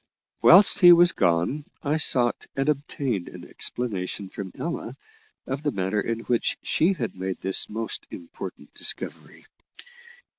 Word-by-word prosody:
Whilst 200 +3 +7
he 175 -3 +9
was 175 0 +7
gone, 85 - 0 0.2
I 150 +2 0
sought 125 -6 +3
and 135 +1 -1
obtained 140 -8 -2
an - - -11
explanation 100 -4 -4
from 95 -2 -7
Ella 165 -7 -5 0.5
of 135 +2 -4
the 150 - 0
manner 95 -3 -1
in 115 +1 -3
which 120 0 -1
she 175 +5 +2
had 120 - -5
made 95 0 -4
this 95 0 +2
most 110 +1 -4
important 265 +2 -10
discovery. - - -5
125 Hz, 140 wpm, -25 LUFS, 100-150 Hz, 0.5 s, he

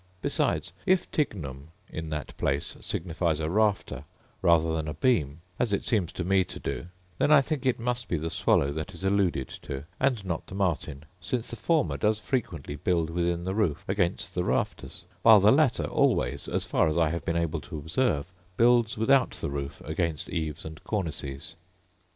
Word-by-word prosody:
Besides, - - 0
if 185 -1 +2
tignum 75 - -2 0.2
in 80 0 -6
that 75 -2 -5
place 70 +1 -1
signifies 80 -2 -1
a 80 0 -1
rafter 100 -10 +1 0.4
rather 80 -1 +4
than 80 -1 -2
a 75 - -4
beam, 80 - +1 0.2
as 115 -4 +1
it 100 - 0
seems 100 -8 +1
to - - -3
me 95 +1 +3
to - - -7
do, 70 +3 -4 0.3
then 145 - +3
I 150 -2 +8
think 140 -1 -2
it 125 - +2
must 125 +1 -2
be 85 - 0
the 80 +2 -3
swallow 70 - +3
that 80 +5 -5
is 85 - -4
alluded 95 -8 +1
to, 70 0 -5 0.2
and 125 -7 +1
not 85 -3 -3
the 95 - -8
martin; 80 -6 -1
since 115 +7 -3
the - - -4
former 155 +7 +1
does 105 0 +2
frequently 105 - -3
build 85 +1 0
within 85 0 0
the 95 +1 -2
roof 100 -8 0
against 95 -2 0
the 90 - 0
rafters; 90 +1 -2 0.2
while 110 0 +8
the 105 +2 +6
latter 140 -2 +3
always, 70 0 +1
as - - -1
far - - +2
as 80 - 0
I 80 -2 +3
have 85 -1 -3
been 85 0 -1
able 85 -2 -1
to 85 0 -7
observe, 80 - 0 0.3
builds 120 -1 +4
without 130 +5 +4
the - - -3
roof 70 -1 -5
against 80 0 -2
eaves 80 -1 -3
and 80 0 -9
cornices. 75 -6 -3
85 Hz, 185 wpm, -28 LUFS, 75-110 Hz, 0.4 s, I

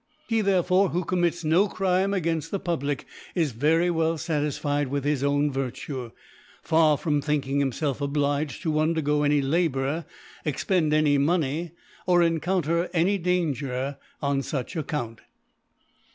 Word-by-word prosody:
He 225 -1 +1
therefore 190 -1 +3
who 180 +2 -1
commits 175 -1 0
no 170 +6 +3
Crime 190 0 +1
againfl 165 -5 -1
the 200 - -2
Public, 145 -6 -2 0.3
is 165 -6 +1
very 160 +9 +2
well 165 0 +1
fatis 150 -3 -1
ficd 145 -1 0
with 140 +1 -2
his 145 -2 0
own 145 +1 +2
Virtue; 130 -1 -4 0.5
far 160 -2 +4
from 150 -2 0
think 150 -2 -1
ing 140 +1 0
himfelf 140 +1 -1
obliged 145 +1 -1
to 160 - 0
^undergo 155 -1 +1
any 145 -1 +3
La 165 +6 +2
bour, 140 +3 -2 0.4
expend 155 +2 0
any 150 -2 +3
Money, 160 +1 0 0.3
or 175 -1 +5
encounter 170 0 0
any 190 +4 +2
Danger 140 -7 -1 0.2
on 140 -1 +1
fuch 135 +1 -4
Account. 140 -8 -4
155 Hz, 145 wpm, -26 LUFS, 140-170 Hz, 0.5 s, or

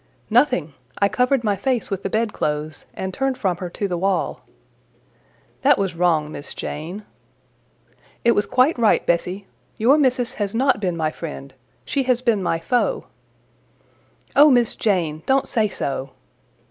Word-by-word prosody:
"Nothing: 225 - +2 0.2
I 200 - +3
covered 250 +3 +1
my 205 -2 +1
face 240 +3 -1
with 195 -1 -2
the 195 - -3
bedclothes, 155 -9 -2
and 190 0 -4
turned 270 +2 -1
from 185 -4 -1
her 180 -1 -5
to 200 +3 -3
the 175 -2 -3
wall." 190 -1 -1 1.2
"That - - +5
was 195 -3 -1
wrong, 165 -3 +1
Miss 145 - -8
Jane." 175 +8 -6 1.2
"It 235 - +5
was 205 -3 +1
quite 255 +3 +2
right, 225 -2 +3
Bessie. 180 +3 -1 0.3
Your 265 +7 +4
Missis 255 -3 +1
has 200 +1 -2
not 265 -2 +2
been 180 -4 -1
my 155 -1 0
friend: 145 -5 -8 0.3
she 280 - 0
has 250 0 +2
been 230 -5 +2
my 170 -2 0
foe." 245 - 0 1.3
"O 295 +2 +8
Miss 245 -4 +3
Jane! 170 -7 0
don't 270 0 +2
say 220 -4 +1
so!" 135 -6 -3
200 Hz, 155 wpm, -22 LUFS, 170-245 Hz, 1.3 s, O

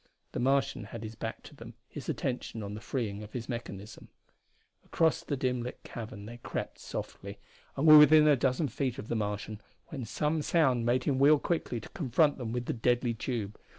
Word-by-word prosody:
The - - -4
Martian 135 -2 +1
had 115 +2 -8
his 110 0 -6
back 115 0 -6
to - - -13
them, 115 -3 -11
his 145 -1 -8
attention 125 -4 -3
on 100 0 -5
the 105 - -7
freeing 110 -7 -3
of 105 0 -10
his 120 -2 -5
mechanism. 110 -4 -7 0.8
Across 165 0 +1
the 145 - -2
dim 125 -2 0
lit 125 +1 -7
cavern 110 -3 -8
they 120 +2 -8
crept - - -5
softly, - - -6 0.4
and 140 - +1
were 155 -1 +11
within 155 0 +8
a 150 - +6
dozen 135 +4 +1
feet 130 +1 -2
of 125 - -7
the - - 0
Martian 105 0 -3 0.3
when 140 -7 -5
some 150 +7 -1
sound 130 -8 +2
made 125 +2 +2
him 135 -2 0
wheel 145 +2 +7
quickly 145 -6 -2
to 110 - -11
confront 145 -1 +2
them 115 -3 -4
with 120 +1 -2
the - - -1
deadly 120 +1 +1
tube. 110 -3 -4
125 Hz, 200 wpm, -30 LUFS, 115-140 Hz, 0.8 s, were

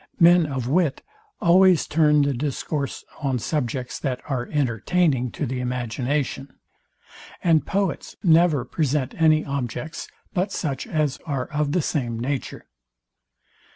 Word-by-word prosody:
Men 175 -1 +6
of 130 -4 -3
wit 155 0 +1 0.4
always 180 0 +5
turn 150 -1 +3
the 140 0 +1
discourse 140 +2 -3 0.2
on 135 -3 0
subjects 125 -1 -3
that 130 -3 -2
are 130 -4 -2
entertaining 140 - +1
to - - -2
the 130 0 -3
imagination; 125 +3 -2 0.9
and 165 -3 +3
poets 200 -2 -2
never 165 -6 +4
present 145 -2 -1
any 155 -1 +4
objects 140 +3 -4 0.3
but 190 +2 0
such 140 -8 -3
as 150 -4 -1
are 135 -4 -1
of 150 -1 0
the 180 - +1
same 120 -7 -2
nature. 130 +2 -4
145 Hz, 125 wpm, -23 LUFS, 130-160 Hz, 0.9 s, Men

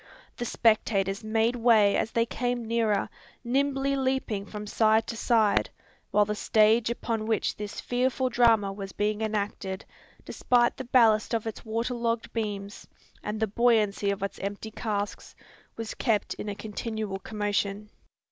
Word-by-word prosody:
The 240 - -4
spectators 210 -3 +1
made 225 +2 +1
way 225 -4 +4
as - - 0
they 230 0 +2
came 245 0 -2
nearer, 225 -3 +1 0.4
nimbly 275 +2 +1
leaping 260 -7 -1
from 210 -1 -7
side 220 +1 +3
to - - -5
side; 220 -2 +2 0.4
while 210 0 +3
the 210 - -2
stage 220 +2 +3
upon 230 -2 -2
which 220 -2 0
this 210 -1 -6
fearful 255 +1 0
drama 225 -5 +3
was 195 -1 -7
being 210 +1 -1
enacted, 205 -3 -3 0.4
despite 240 -1 +2
the 260 - -5
ballast 230 -2 +4
of 225 - -2
its 225 - -6
water 230 +3 -2
logged 235 -1 -2
beams, 205 -3 -4 0.3
and 210 +1 -4
the 220 - +2
buoyancy 215 -2 +2
of 200 0 -2
its 200 - -4
empty 200 +2 -5
casks, 205 -2 -4 0.4
was 225 -1 -4
kept 225 -4 0
in 210 - -6
a 205 - -4
continual 215 -1 -4
commotion. 205 0 -2
220 Hz, 150 wpm, -27 LUFS, 205-235 Hz, 0.4 s, way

